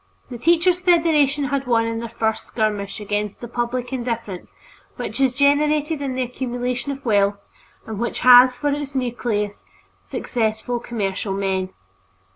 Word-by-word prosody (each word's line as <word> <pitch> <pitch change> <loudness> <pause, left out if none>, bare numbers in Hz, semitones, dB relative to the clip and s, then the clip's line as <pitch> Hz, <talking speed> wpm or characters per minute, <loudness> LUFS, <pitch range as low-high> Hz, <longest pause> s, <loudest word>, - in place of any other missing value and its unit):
The 240 - -6
Teachers' 345 +5 +3
Federation 315 -5 +3
had 275 -1 -2
won 230 -2 +3
in 230 0 -2
their 235 0 -5
first 220 -1 -2
skirmish 210 -2 -2
against 210 0 -3
that 240 0 -9
public 245 +1 -2
indifference 230 -7 -4 0.4
which - - -4
is 260 -2 +2
generated 295 +2 +2
in 270 -2 -2
the 260 - 0
accumulation 250 +1 -3
of 275 -1 -8
wealth 200 -2 +2 0.5
and 220 -2 -6
which 235 - -2
has 250 0 +8
for 290 - 0
its 285 -1 -4
nucleus 230 -5 -2 0.5
successful 225 +1 -2
commercial 200 -4 -3
men. 190 -1 -1
245 Hz, 145 wpm, -22 LUFS, 220-275 Hz, 0.5 s, has